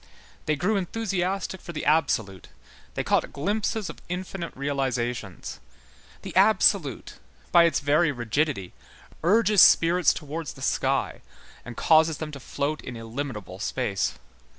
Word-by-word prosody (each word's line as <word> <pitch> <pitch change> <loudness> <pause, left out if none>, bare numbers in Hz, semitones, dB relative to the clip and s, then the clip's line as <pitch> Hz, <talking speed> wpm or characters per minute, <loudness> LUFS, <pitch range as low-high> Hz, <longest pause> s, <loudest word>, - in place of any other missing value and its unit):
They 155 - +2
grew 190 +8 0
enthusiastic 190 -1 -2
for 170 - -8
the 150 - -5
absolute, 115 - +1 0.5
they - - -1
caught - - +1
glimpses 205 +6 -2
of - - -9
infinite 180 -1 -5
realizations; 125 -7 -3 0.6
the - - -8
absolute, - - +3 0.3
by 170 - +7
its 165 -4 +1
very 150 +3 +3
rigidity, 120 - -2 0.5
urges 210 +2 +4
spirits 170 -1 +6
towards 155 0 -6
the - - -10
sky - - 0 0.4
and 120 -2 -9
causes 160 -1 +4
them 155 -1 -5
to 140 - -8
float 145 +4 -3
in 125 -2 -8
illimitable 115 -5 -6
space. 100 -1 -2
150 Hz, 130 wpm, -26 LUFS, 125-175 Hz, 0.6 s, by